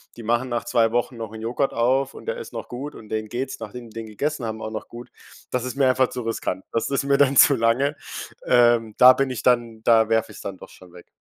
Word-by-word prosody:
die 120 - -10
machen 120 +3 0
nach 120 -1 -2
2 115 -2 +2
Wochen 120 0 -1
noch 110 -2 -6
'n 110 - -8
Joghurt 125 +5 -1
auf 130 +4 +1
und - - -12
der 485 +1 -2
ist 470 - -9
noch - - -6
gut 140 +5 -6
und 110 - -13
denen 110 -1 -3
geht's, 130 +2 -4
nachdem 120 -2 -8
die - - -18
den 110 - -6
gegessen 135 +4 -3
haben, 110 0 -5
auch 110 - -5
noch 110 - -6
gut. 120 0 -11 0.4
Das 125 -1 -1
ist 125 - -5
mir 135 -1 +3
einfach 130 0 +2
zu 125 - -5
riskant. 110 -4 -3
Das 115 - -1
ist 135 - 0
mir 140 0 +2
dann 140 -1 +3
zu 140 - +7
lange. 125 +6 +1 0.5
Ähm, 120 -3 +4
da 130 0 +9
bin 135 0 0
ich 125 - -4
dann 120 -3 +1
da 115 -2 +5
werfe 110 -1 0
ich's - - -11
dann 95 -2 -6
doch - - -13
schon 90 -1 -17
weg. 90 - -14
120 Hz, 260 wpm, -23 LUFS, 110-130 Hz, 0.5 s, da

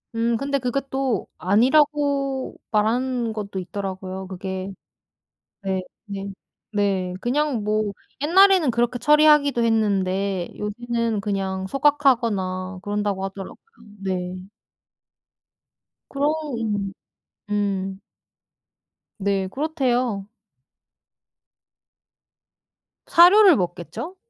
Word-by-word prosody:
음. 230 0 +1
근데 280 +2 -1
그게 255 +1 -1
또 265 -6 -1
아니라고 275 +5 +2 0.2
말하는 235 +2 +1
것도 200 -3 -5
있더라고요 190 0 -5
그게. 190 +1 -5 0.9
네. 190 -1 -1 0.2
네. 200 -1 -5 0.5
네. 195 -3 0
그냥 255 -2 0
뭐 215 -1 0 0.3
옛날에는 370 -1 +5
그렇게 240 +1 0
처리하기도 295 -1 +5
했는데 195 -4 0
요새는 230 +1 -2
그냥 195 -2 -2
소각하거나 230 -9 +1
그런다고 205 -1 -2
하더라고요. 195 0 -7 0.5
네. 185 0 -4 1.6
그러 285 +2 +1 0.2
음. 205 -3 -2 0.6
음. 195 -2 -1 1.2
네. 195 -1 0
그렇대요. 250 - -1 2.8
사료를 365 +2 +7
먹겠죠? 180 - -4
215 Hz, 195 characters per minute, -23 LUFS, 195-270 Hz, 2.8 s, 사료를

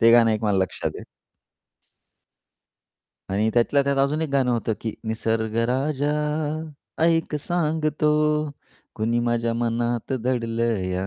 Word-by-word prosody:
ते 115 0 +7
गाणं 115 -1 +6
एक 110 +1 -1
मला 100 -2 +2
लक्षात 95 - -1
आहे. - - -10 2.2
आणि 105 +3 +1
त्यातल्या 140 +4 +3
त्यात 140 0 0
अजून 140 +3 +2
एक 160 - -1
गाणं 135 -2 +2
होतं 115 -1 0
की 110 -2 -3
निसर्ग 110 0 -1
राजा 140 +3 0 0.9
ऐक 165 -2 +2
सांगतो, 150 -2 +1 0.4
कुणी 115 +2 0
माझ्या 120 -1 0
मनात 120 +1 -1
दडलं 115 -2 0
या 95 +1 -2
120 Hz, 125 wpm, -24 LUFS, 115-145 Hz, 2.2 s, ते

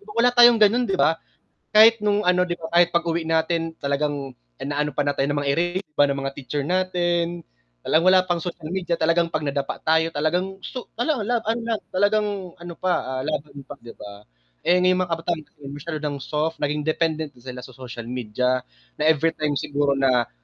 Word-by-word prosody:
wala 245 +1 +5
tayong 240 -2 +7
gano'n, 240 +4 +4
di 195 - 0
ba? 165 -2 +2 0.5
Kahit 220 +1 +6
nung 210 -1 +1
ano, 180 0 +4
'di 175 -1 -2
ba, 160 - -6
kahit 175 0 +5
pag-uwi 170 -1 0
natin 165 0 -1
talagang 140 -1 -2 0.2
inaano 145 +1 -2
pa 145 +1 -2
nga 145 - +1
tayo 135 +1 0
ng 145 - 0
mga 140 -1 0
ere 170 - +2 0.3
ba - - +4
ng 140 - -2
mga 135 0 -4
teacher 140 +1 -4
natin. 175 -1 0 0.4
Talagang 165 +3 +2
wala 185 - +6
pang 175 -1 -1
social 170 -2 -6
media, 180 -2 -1
talagang 165 +1 +2
'pag 160 -2 -3
nadapa 140 -1 -2
tayo, 160 +1 +2
talagang 180 +6 -1
so 250 - -7
wala, 250 +4 0
laban 230 -1 0
lang, 225 -2 -2
talagang 205 -2 0
ano 175 -1 -7
pa, 130 -8 -1
ah, - - -2
laban 150 -2 -4
pa, 145 - -8
'di 120 - -10
ba? 100 0 -10 0.4
Eh, 180 - +4
ngayon 185 0 +3
mga 175 - -5
kabataan 165 -1 -2
kasi - - -30
masyado 145 +3 -5
ng 150 -1 -3
soft, 155 +2 -2
naging 150 +1 -1
dependent 155 -1 -1
na 120 - -20
sila 125 0 -8
sa 130 - -15
social 120 -2 -8
media, 125 +1 -1 0.3
na - - -5
everytime 155 -2 0
siguro 145 -1 0
na 125 -3 +2
160 Hz, 195 wpm, -23 LUFS, 145-180 Hz, 0.5 s, tayong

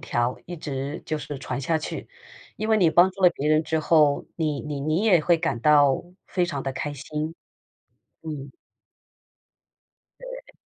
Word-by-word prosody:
条， 120 +1 -1
一 175 0 -6
直 140 0 -5
就 155 -1 -2
是 145 -2 -6
传 135 - -4
下 160 +4 +1
去。 155 - -5 0.5
因 215 +1 -3
为 220 - +5
你 175 -4 +5
帮 175 +3 +5
助 195 +1 -13
了 180 - +9
别 150 -3 -3
人 155 +1 +4
之 160 0 -1
后， 150 -2 +3
你 155 -4 -1
你 150 -2 -4
你 155 +7 0
也 180 -7 +5
会 170 +2 +3
感 160 -8 -2
到 145 -2 +5 0.2
非 180 -2 0
常 145 -5 -4
地 135 - -3
开 145 +2 -4
心。 150 +3 -4 0.9
嗯。 145 -4 -6 1.7
对。 - - -10
155 Hz, 180 characters per minute, -25 LUFS, 140-170 Hz, 1.7 s, 了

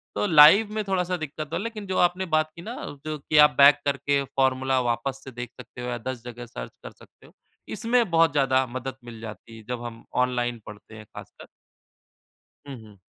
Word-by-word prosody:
तो - - 0
लाइव 165 +6 +7
में 215 0 -2
थोड़ा-सा 180 -1 -1
दिक्कत 155 -1 -6
तो 165 - -4
है, 175 - -2
लेकिन 225 -3 -6
जो 190 - -2
आपने 180 +2 +2
बात 155 0 +1
की 170 - -10
ना 225 +7 -7
कि 145 - -9
जो 155 - -3
कि 150 +2 -1
आप 150 - 0
बैक 140 +1 +7
करके 140 0 0
फॉर्मूला 130 0 +1
वापस 130 +3 -3
से 135 - -9
देख 120 0 -7
सकते 125 0 -11
हो 125 - -5
या 120 - -3
10 120 0 -6
जगह 120 0 -8
सर्च - - -8
कर - - -8
सकते - - -21
हो। - - -19 0.4
इसमें 230 +1 +1
बहुत 165 -2 +4
ज़्यादा 130 -2 +2
मदद 130 +1 -6
मिल 120 -2 -10
जाती 115 +1 -10
है 110 - -13
जब 125 -1 -4
हम 115 -1 -8 0.2
ऑनलाइन 120 -1 -2
पढ़ते 105 +1 -12
हैं 110 - -11
खासकर। - - -12 1.2
हुँ, 140 - -7
हुँ। 105 -2 -16
135 Hz, 215 wpm, -25 LUFS, 120-165 Hz, 1.2 s, लाइव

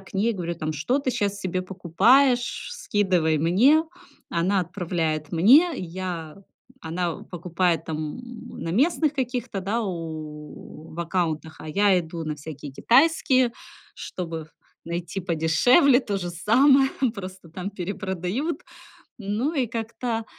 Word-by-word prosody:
к 195 - -17
ней, 220 +4 +2
говорю 170 -3 -4
там: 155 -1 -3
"Что 200 - 0
ты 270 -2 -1
сейчас 205 -4 -1
себе 185 -1 -2
покупаешь? 240 - +2
Скидывай 190 - +1
мне". 235 - +4 0.5
Она 185 +4 +1
отправляет 165 -4 -2
мне, 270 - +6
и - - -4
я 170 -3 -5 0.5
она 170 0 -2
покупает 175 -1 -1
там, 155 +3 -4
м, 240 -2 -10
на 165 - -4
местных 300 - +2
каких-то, 250 -6 -3
да, 210 +5 -1
у 155 -4 -7
в 170 - -11
аккаунтах, 165 -2 -2
а 155 - -8
я 200 +4 +3
иду 165 0 -6
на 155 -1 -3
всякие 145 -1 -9
китайские, 260 - +3 0.4
чтобы 165 -3 -6 0.4
найти 170 +3 -4
подешевле 185 - +4
то 205 -6 -3
же 175 -2 -4
самое, 265 - +4 0.2
просто 185 -4 -8
там 185 +4 -5
перепродают. 195 - -3 0.6
Ну 215 +8 -1
и 265 -4 +1
как-то, 230 0 -3
185 Hz, 130 wpm, -25 LUFS, 165-240 Hz, 0.6 s, мне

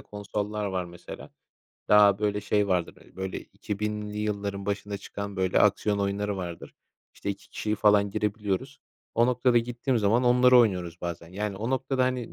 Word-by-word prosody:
konsollar 105 0 -4
var, 95 -2 -2
mesela, 85 0 -10 0.6
daha, 105 -1 +6
böyle, 105 -1 0
şey 105 -1 +1
vardır. 90 -3 0
Hani, - - -22
böyle 95 0 -4
2000'li 105 0 -5
yılların 100 -2 -3
başında 100 0 -3
çıkan 100 0 -7
böyle 95 -1 +2
aksiyon 105 -1 +3
oyunları 100 0 -1
vardır. 85 -3 -7 0.4
İşte, 100 - -4
2 100 - -8
kişiyle 105 0 -2
falan 105 -1 +4
girebiliyoruz. 105 -2 -2 0.3
O 115 +1 +4
noktada 125 -1 +3
gittiğim 120 +1 -1
zaman 110 +4 +2
onları 125 +1 +6
oynuyoruz 90 -7 +1
bazen. 85 -1 -5
Yani, 100 +2 -4
o 115 +5 -3
noktada, 130 0 +1
hani, 125 -2 -2
105 Hz, 160 wpm, -27 LUFS, 100-110 Hz, 0.6 s, daha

